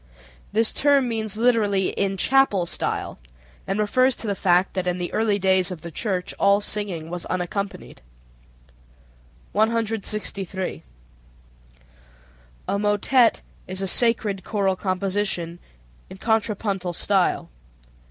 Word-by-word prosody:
This 220 +2 +2
term 280 -2 +3
means 220 -3 -2
literally 215 -5 +2
"in 195 -1 -1
chapel 255 -6 +3
style," 165 -2 -3 0.5
and 195 +2 -1
refers 255 +5 +3
to - - -7
the 205 - 0
fact 180 -1 +2
that 185 -1 -2
in 180 0 0
the 175 -1 -4
early 215 -2 +2
days 190 -1 +3
of 180 -4 -7
the 170 - -8
church 185 0 -2
all 200 0 +4
singing 195 -6 -3
was 175 -1 -5
unaccompanied. 185 - -4 1.5
163. 215 -4 -1 1.9
A 200 - 0
motet 210 +4 +3 0.3
is 185 +1 -3
a - - -1
sacred 210 -3 +2
choral 195 -3 0
composition 185 -2 -2 0.5
in - - -10
contrapuntal 200 -4 -1
style. 190 - +1
200 Hz, 115 wpm, -23 LUFS, 185-220 Hz, 1.9 s, all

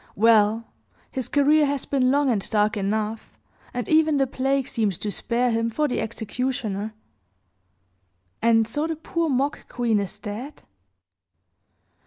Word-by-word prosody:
Well, 220 +1 +4 0.5
his 260 -2 -3
career 290 +1 +4
has 280 -1 -2
been 260 -2 +2
long 285 +1 +3
and 205 -4 -1
dark 210 0 +2
enough, 215 +2 -3 0.3
and 245 -3 -4
even 310 -1 +4
the 270 - +3
plague 270 +1 0
seemed 210 -9 -1
to 210 - -3
spare 240 +4 0
him 230 0 0
for 300 +7 0
the 250 - -1
executioner. 220 -2 -3 1.5
And 225 -1 +4
so 295 +7 -1
the 325 - -2
poor 330 +1 -2
mock 275 +2 -1
queen 235 -3 +1
is 200 -2 -4
dead? 240 +8 -7
240 Hz, 140 wpm, -24 LUFS, 215-275 Hz, 1.5 s, Well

